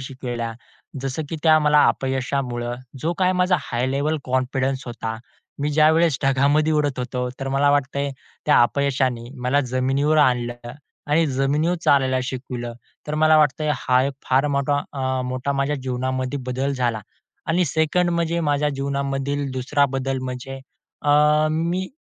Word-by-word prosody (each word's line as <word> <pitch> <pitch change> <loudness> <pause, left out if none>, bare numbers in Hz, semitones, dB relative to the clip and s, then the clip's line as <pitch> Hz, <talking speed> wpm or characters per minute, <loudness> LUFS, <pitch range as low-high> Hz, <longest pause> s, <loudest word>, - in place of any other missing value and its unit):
शिकवल्या. 120 -3 -5 0.5
जसं 135 +3 -3
की 165 - -4
त्या 155 -1 +6
मला 150 -1 +4
अपयशामुळं 130 -2 -2 0.3
जो 165 +5 0
काही 185 0 +3
माझा 180 0 +3
हाय 120 +2 -2
लेव्हल 145 +3 0
कॉन्फिडन्स 130 +1 -1
होता, 115 -2 -4 0.4
मी 145 - 0
ज्यावेळेस 155 -1 +4
ढगामध्ये 140 +3 +3
उडत 145 -3 0
होतो, 125 0 -2
तर 135 - -3
मला 140 +1 +3
वाटतंय, 140 0 0 0.4
त्या 150 - +5
अपयशाने 130 -2 0
मला 135 +3 +2
जमिनीवर 135 +4 +1
आणलं 120 -3 +1 0.3
आणि 160 +3 +3
जमिनीवर 145 +5 +1
चालायला 130 -2 +3
शिकवलं. 125 -2 -5 0.3
तर 150 - -3
मला 155 0 +5
वाटतंय 150 +1 +2
हा 125 0 +2
एक 140 - -1 0.2
फार 135 +3 +3
मोठा 145 0 +1
अ, 130 -2 -1
मोठा 130 +2 -2
माझ्या 140 +2 0
जीवनामध्ये 130 +1 -2
बदल 135 +2 -1
झाला 120 -4 -1 0.5
आणि 175 +2 +2
सेकंड 160 +4 +1
म्हणजे 170 0 0
माझ्या 145 -1 +1
जीवनामधील 140 0 -2
दुसरा 140 +3 +1
बदल 135 0 -1
म्हणजे 130 +1 -6 0.4
अ, 145 - +1 0.4
मी 170 +4 -1
135 Hz, 145 wpm, -22 LUFS, 130-150 Hz, 0.5 s, त्या